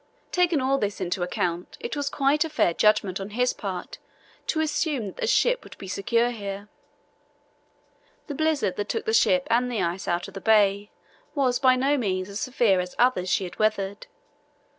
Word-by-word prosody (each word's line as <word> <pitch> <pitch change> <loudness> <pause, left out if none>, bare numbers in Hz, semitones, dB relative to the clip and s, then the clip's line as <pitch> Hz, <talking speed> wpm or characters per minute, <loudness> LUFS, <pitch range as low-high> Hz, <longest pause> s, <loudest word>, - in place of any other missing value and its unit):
Taking 355 -4 +2
all 270 +1 +1
this 205 -3 -2
into 185 0 -2
account, 175 0 -2
it 235 - -4
was 285 -1 -1
quite 280 +2 +2
a 320 - -5
fair 175 - +2
judgment 205 -1 +2
on 195 +1 -6
his 250 0 +2
part 190 -4 -6 0.5
to 315 - 0
assume 300 -5 0
that 195 - -8
the 475 - -2
ship - - +2
would - - -13
be 195 - -9
secure 230 +5 +1
here. 200 -2 -6 1.6
The 295 - -5
blizzard 290 - 0
that 205 - -3
took 450 0 -2
the 440 - 0
ship 275 -10 +3
and 245 +2 +2
the 230 - -1
ice 175 +2 -3
out 175 -1 -1
of - - -12
the 195 - -7
bay 205 -1 +3 0.5
was 255 -4 +1
by 255 -1 +5
no 275 +3 +1
means 185 -4 -2
as 200 +1 -5
severe 235 -7 +2
as 180 0 -4
others 240 -7 +2
she 195 - +1
had 180 - -8
weathered. 205 -2 -1
220 Hz, 190 wpm, -25 LUFS, 195-275 Hz, 1.6 s, by